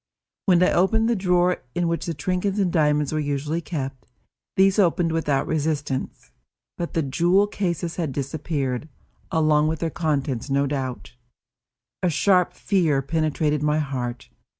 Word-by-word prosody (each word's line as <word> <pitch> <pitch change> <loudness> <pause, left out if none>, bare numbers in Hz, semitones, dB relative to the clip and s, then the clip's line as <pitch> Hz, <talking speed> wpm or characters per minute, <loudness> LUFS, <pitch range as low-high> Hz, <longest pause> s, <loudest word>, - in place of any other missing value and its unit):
When 180 -2 +5
I - - +4
opened 220 +5 +3
the 235 - +2
drawer 180 -2 +2
in 175 -1 +1
which 170 +1 -2
the 165 - -2
trinkets 185 +6 -1
and 190 -4 +1
diamonds 150 -3 +2
were 155 - 0
usually 150 +3 -2
kept, 135 -6 -5 0.5
these 195 +2 +4
opened 175 -3 +3
without 150 -4 0
resistance, 145 -3 -2 0.4
but 170 - -5
the 165 - +2
jewel 175 +9 +3
cases 175 -4 -3
had 165 -5 -1
disappeared, 140 0 -3 0.4
along 155 -1 +3
with 160 +1 -1
their 165 0 -2
contents 145 -6 -1
no 140 +1 +2
doubt. 135 -3 -4 0.9
A 180 - +2
sharp 180 +2 +3
fear 160 -9 +1
penetrated 150 0 0
my 150 0 +2
heart. 125 -5 -3
160 Hz, 150 wpm, -23 LUFS, 145-175 Hz, 0.9 s, When